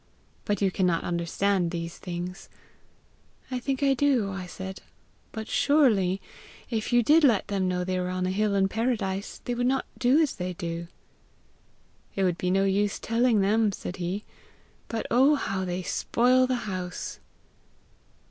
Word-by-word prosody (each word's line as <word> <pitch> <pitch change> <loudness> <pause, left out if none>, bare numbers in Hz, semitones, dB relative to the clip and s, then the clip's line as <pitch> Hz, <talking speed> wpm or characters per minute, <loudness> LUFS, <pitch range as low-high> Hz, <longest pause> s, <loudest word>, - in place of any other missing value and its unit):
But 205 0 0
you 195 - +3
cannot 180 -3 +1
understand 175 +2 0
these 170 -1 -5
things.' 180 0 -6 1.0
'I 255 - -1
think 270 +2 -2
I 275 -1 +4
do,' 255 -7 +2
I 190 -1 -5
said; 190 +1 -7 0.5
'but 220 -1 -6
surely, 215 -11 +3 0.5
if 220 0 -2
you 240 0 +4
did 305 +7 +5
let 230 -8 +3
them 195 -2 0
know 180 0 0
they 185 0 -1
were 180 0 -2
on 185 0 -1
a 185 - 0
hill 205 +1 +1
in 195 -1 +3
paradise, 210 -3 -2
they 245 - -1
would 245 +1 0
not 265 +1 +1
do 260 +4 +4
as 310 -4 +2
they 180 0 -3
do!' 170 0 -5 1.3
'It 195 - 0
would 180 -2 +1
be 180 - 0
no 195 +1 +3
use 200 +1 +1
telling 230 -1 +2
them,' 210 +2 +3
said 185 -1 -6
he; 185 +4 -3 0.6
'but, 225 -1 -3
oh, 270 +5 +5
how 195 -8 -2
they 180 0 -3
spoil 255 +7 +2
the 255 - +1
house!' 185 -3 -5
195 Hz, 165 wpm, -27 LUFS, 185-240 Hz, 1.3 s, did